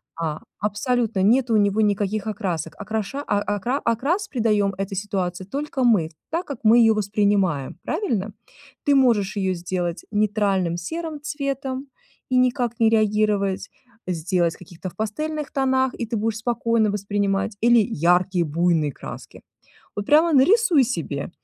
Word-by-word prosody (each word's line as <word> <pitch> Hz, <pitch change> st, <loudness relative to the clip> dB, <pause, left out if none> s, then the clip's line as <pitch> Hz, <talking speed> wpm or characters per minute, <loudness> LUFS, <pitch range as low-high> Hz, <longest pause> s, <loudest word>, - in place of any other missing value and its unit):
А 160 Hz, -2 st, -3 dB, 0.2 s
абсолютно 215 Hz, 0 st, 0 dB
нету 235 Hz, +3 st, +3 dB
у -, -, +5 dB
него 205 Hz, +1 st, +2 dB
никаких 205 Hz, 0 st, 0 dB
окрасок. 175 Hz, -7 st, -3 dB
Окраша 220 Hz, +7 st, -3 dB
а 205 Hz, 0 st, +1 dB
акра 245 Hz, +8 st, -2 dB
окрас 290 Hz, -, 0 dB
придаём 210 Hz, -4 st, +2 dB
этой 195 Hz, +1 st, -4 dB
ситуации 185 Hz, -2 st, -3 dB
только 275 Hz, +2 st, -3 dB
мы, 200 Hz, -10 st, +3 dB, 0.2 s
так 340 Hz, +3 st, -1 dB
как 280 Hz, -5 st, -6 dB
мы 225 Hz, +2 st, +7 dB
её 225 Hz, -1 st, +6 dB
воспринимаем. 200 Hz, -8 st, 0 dB
Правильно? 215 Hz, -, -2 dB, 0.5 s
Ты 285 Hz, -, +5 dB
можешь 215 Hz, -7 st, +2 dB
её 190 Hz, -2 st, 0 dB
сделать 175 Hz, 0 st, -3 dB
нейтральным 205 Hz, -4 st, +1 dB
серым 320 Hz, -, -5 dB
цветом 275 Hz, -2 st, -4 dB, 0.4 s
и 255 Hz, -, +3 dB
никак 250 Hz, -2 st, +1 dB
не 225 Hz, -1 st, +5 dB
реагировать, 210 Hz, -3 st, +1 dB, 0.4 s
сделать 170 Hz, 0 st, 0 dB
в -, -, -19 dB
каких-то 180 Hz, +1 st, -8 dB
в -, -, -19 dB
пастельных 300 Hz, +8 st, -3 dB
тонах, 260 Hz, -1 st, +1 dB
и -, -, -4 dB
ты 230 Hz, +1 st, -4 dB
будешь 220 Hz, +1 st, -1 dB
спокойно 230 Hz, -2 st, +1 dB
воспринимать, 200 Hz, 0 st, -1 dB
или 240 Hz, 0 st, +6 dB
яркие 180 Hz, -1 st, +2 dB
буйные 160 Hz, -1 st, +1 dB
краски. -, -, -10 dB, 0.5 s
Вот 205 Hz, 0 st, -3 dB
прямо 310 Hz, +2 st, +4 dB
нарисуй 335 Hz, -, +5 dB
себе, 165 Hz, -, -3 dB
210 Hz, 145 wpm, -23 LUFS, 190-250 Hz, 0.5 s, мы